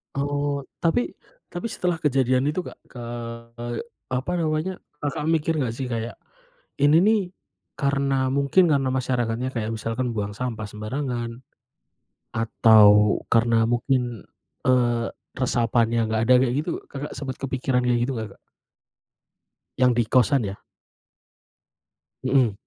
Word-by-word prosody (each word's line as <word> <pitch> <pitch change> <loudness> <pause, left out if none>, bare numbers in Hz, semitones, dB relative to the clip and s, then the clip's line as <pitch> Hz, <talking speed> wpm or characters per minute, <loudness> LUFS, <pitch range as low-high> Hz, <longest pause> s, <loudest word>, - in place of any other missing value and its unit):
Oh, 145 0 -1 0.2
tapi 210 +9 +1 0.4
tapi 175 +6 -6
setelah 180 -6 -1
kejadian 135 -3 +2
itu 150 +5 0
Kak, - - -10
ke 120 - -11 1.1
apa 130 +8 -1
namanya, 160 +3 -1 0.2
Kakak 150 +1 -2
mikir 160 0 +1
gak 125 -5 -1
sih, 125 +1 -4
kayak, 115 0 -4 0.6
ini 145 +3 +5
nih 220 -2 +4 0.6
karena 140 -2 +1
mungkin 140 +6 +3
karena 135 -2 +2
masyarakatnya 125 -1 -1
kayak 110 -1 -2
misalkan 115 +3 -2
buang 105 -2 -3
sampah 115 -3 -4
sembarangan, 120 +2 -4 1.0
atau 105 -2 +5
karena 115 0 +3
mungkin, 120 -3 -1 0.4
eee, 120 -2 +3 0.3
resapannya 115 -2 +1
gak 110 0 +1
ada, 125 - +6
kayak 125 -1 +1
gitu, 160 +3 -2 0.2
Kakak 145 +1 -6
sempet 130 -2 -5
kepikiran 130 -2 -1
kayak 120 -1 +3
gitu 135 +2 0
gak 110 - -4
Kak? - - -28 1.4
Yang 125 -1 +5
di 120 - +4
kosan 130 +3 +3
ya? - - -17 1.6
Hmm. 130 -4 +3
130 Hz, 125 wpm, -24 LUFS, 115-140 Hz, 1.6 s, ada